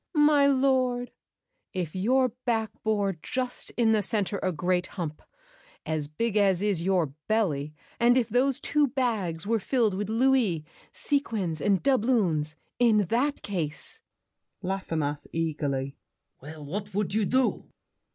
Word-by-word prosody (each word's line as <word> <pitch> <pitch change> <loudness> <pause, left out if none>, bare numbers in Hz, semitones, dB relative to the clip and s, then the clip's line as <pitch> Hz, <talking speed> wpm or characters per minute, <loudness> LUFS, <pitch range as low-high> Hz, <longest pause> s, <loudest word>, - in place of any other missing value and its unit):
My 295 -1 +5
lord, 260 -2 +2 0.6
if 175 -4 -3
your 255 +7 +2
back 225 -3 0
bore 205 -3 +1
Just 255 -1 -3
in 230 -2 +4
the 215 -1 +3
center 200 -1 -1
a 185 - 0
great 180 +2 0
hump, 155 -4 -4 0.6
as 155 -2 -2
big 215 +9 -2
As 195 -3 +3
is 200 -4 0
your 175 -6 +1
belly, 155 -10 0 0.2
and 240 +1 +5
if 240 -4 +2
those 250 +3 +1
two 295 0 +2
bags 220 -11 -1
Were 225 +2 +1
filled 225 -1 +1
with 205 +2 -3
louis, 225 -9 +2 0.3
sequins, 215 - -1
and 200 -2 +2
doubloons, 210 - +2 0.2
In 235 -3 +5 0.2
that 280 +5 +1
case— 165 -7 -4 0.6
LAFFEMAS 165 -6 -2
(eagerly). 145 -4 -2 0.4
Well, 150 +2 -9
what 200 +6 -5
would 205 -1 -1
you 215 -1 +2
do? 260 +4 +1
205 Hz, 135 wpm, -27 LUFS, 165-245 Hz, 0.6 s, My